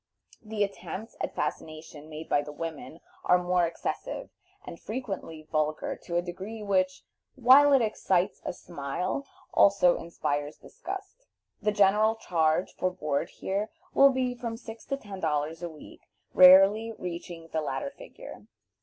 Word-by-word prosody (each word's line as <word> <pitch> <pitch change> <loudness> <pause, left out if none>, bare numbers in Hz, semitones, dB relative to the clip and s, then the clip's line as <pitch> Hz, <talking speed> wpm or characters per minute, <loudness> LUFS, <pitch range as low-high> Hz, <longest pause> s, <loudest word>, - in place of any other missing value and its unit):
The 215 -1 -1
attempts 200 +2 -6
at - - -3
fascination 155 -1 -5
made 155 +1 -8
by 145 - +2
the 145 +1 -8
women 160 +1 -7 0.2
are 180 - +5
more 180 -1 +2
excessive, 170 - -5 0.3
and 170 - -9
frequently 195 -9 -6
vulgar 155 0 -1
to 170 - -4
a 175 - +1
degree 195 +5 -7
which, 185 -2 0 0.3
while 270 +3 +7
it 270 -4 +5
excites 190 -4 0
a - - -2
smile, 175 - -4 0.3
also 195 -3 +5
inspires 145 -3 -3
disgust. - - -9 0.3
The 210 0 +2
general 210 +2 +4
charge 165 -4 0
for 185 - 0
board 155 -2 -2
here 200 +3 -3 0.2
will 275 - +7
be 255 -2 0
from 235 -2 -5
six 225 -1 -10
to 275 - -2
ten 205 -7 -9
dollars 155 0 -1
a 175 - -4
week, 155 -2 -13 0.3
rarely 195 +5 +7
reaching 170 -2 -7
the 160 - -1
latter 275 - -3
figure. - - -12
185 Hz, 145 wpm, -28 LUFS, 165-220 Hz, 0.3 s, while